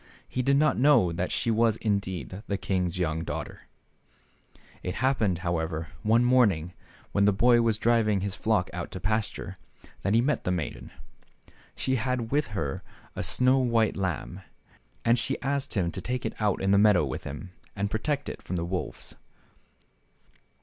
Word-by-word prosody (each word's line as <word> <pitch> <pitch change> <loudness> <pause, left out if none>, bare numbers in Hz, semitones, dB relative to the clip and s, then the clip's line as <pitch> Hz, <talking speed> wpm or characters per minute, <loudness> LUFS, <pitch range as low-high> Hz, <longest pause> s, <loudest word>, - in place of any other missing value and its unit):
He 130 - -2
did 140 +2 +3
not 150 -2 +3
know 125 - +5
that 85 +2 -2
she 115 - 0
was 115 0 +3
indeed 95 - -2
the 100 - -1
king's 90 -2 -1
young 80 -2 -1
daughter. - - -6 1.1
It 90 - -4
happened, 115 -8 +1
however, 80 -2 -2
one 115 +3 +3
morning, 100 -10 +3 0.4
when 100 0 +3
the 105 - +5
boy 120 +4 +4
was 115 -2 +2
just 110 - -6
driving 110 -4 +3
his 100 -1 -2
flock 100 -2 0
out 85 -1 -4
to 95 - -5
pasture, 100 -1 -2 0.4
that 100 +2 +1
he - - +5
met 145 +4 0
the - - -1
maiden. 90 -5 -3 0.9
She 130 0 0
had 125 -1 -2
with 150 +2 +1
her 70 -4 -2 0.3
a - - -3
snow 130 +1 +2
white 115 -4 +2
lamb, 90 -11 -3 0.6
and 115 +1 +4
she 135 - -1
asked 140 -1 -1
him 90 -4 +1
to - - -6
take 125 0 -3
it - - -2
out 105 -3 +1
in 95 - +2
the 100 - +5
meadow 100 -6 +5
with 65 - -5
him, 75 +6 -7 0.2
and 100 0 -2
protect 140 +6 -1
it - - -6
from 90 - -5
the 85 -1 -1
wolves. 90 +1 -5
105 Hz, 175 wpm, -27 LUFS, 90-120 Hz, 1.1 s, know